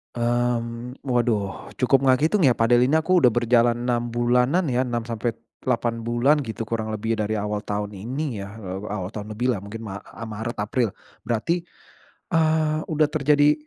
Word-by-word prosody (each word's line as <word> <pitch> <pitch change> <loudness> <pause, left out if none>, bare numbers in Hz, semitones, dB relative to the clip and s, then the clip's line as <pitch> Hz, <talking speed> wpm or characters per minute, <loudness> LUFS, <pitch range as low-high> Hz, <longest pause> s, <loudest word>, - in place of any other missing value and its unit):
Mmm, 120 0 -1
waduh 120 -6 -1
cukup 135 +1 +2
nggak 130 +1 +4
ngitung, 165 +1 +3
ya, 125 - +6
padel 120 +2 +4
ini 140 - 0
aku 185 +3 +3
udah 125 -8 +5
berjalan 120 0 +3
6 120 -1 -1
bulanan 125 +8 +3
ya, 125 +1 +1
6-8 115 0 -3
bulan, 120 +6 +3
gitu, 110 0 -5
kurang 110 -1 -2
lebih 110 +1 -1
dari 110 0 -1
awal 105 0 -2
tahun, 105 0 -3
ini 125 +4 -3
ya, 100 - -10 0.4
awal 95 -2 -3
tahun 105 0 -6
lebihlah, 120 +1 0
mungkin 100 +4 -8
ma 100 -3 -6
eee, 115 - -9
Maret, 110 +2 -4
April 115 0 0 0.3
berarti, 165 +10 0 0.7
eee, 155 -1 +2
udah 155 -2 +2
terjadi 145 0 +4
120 Hz, 160 wpm, -24 LUFS, 110-130 Hz, 0.7 s, ya